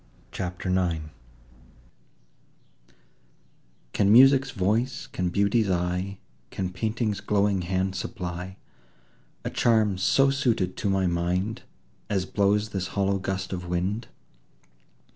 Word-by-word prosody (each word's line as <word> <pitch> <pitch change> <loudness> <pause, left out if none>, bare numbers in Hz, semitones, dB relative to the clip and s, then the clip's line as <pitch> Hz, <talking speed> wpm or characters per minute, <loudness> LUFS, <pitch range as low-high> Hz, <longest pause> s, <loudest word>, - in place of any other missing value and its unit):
CHAPTER 90 0 -4
IX 85 -4 0 2.8
Can 100 0 +3
Music's 135 +3 +7
voice, 115 +7 -1
can 90 -1 -2
Beauty's 100 +3 +2
eye, 90 +2 -1 0.3
Can 95 -2 -3
Painting's 110 +3 -2
glowing 100 -2 +1
hand 95 +1 -1
supply 90 0 -5 0.9
A - - -2
charm 110 -5 +2
so 135 +8 +4
suited 115 -10 0
to 100 - -1
my 95 -1 +1
mind, 90 +5 -1 0.5
As 95 -3 0
blows 105 +2 +1
this 95 -2 -3
hollow 100 0 +1
gust 95 0 -3
of 90 -1 -5
wind? 95 +6 -2
95 Hz, 105 wpm, -26 LUFS, 90-105 Hz, 2.8 s, Music's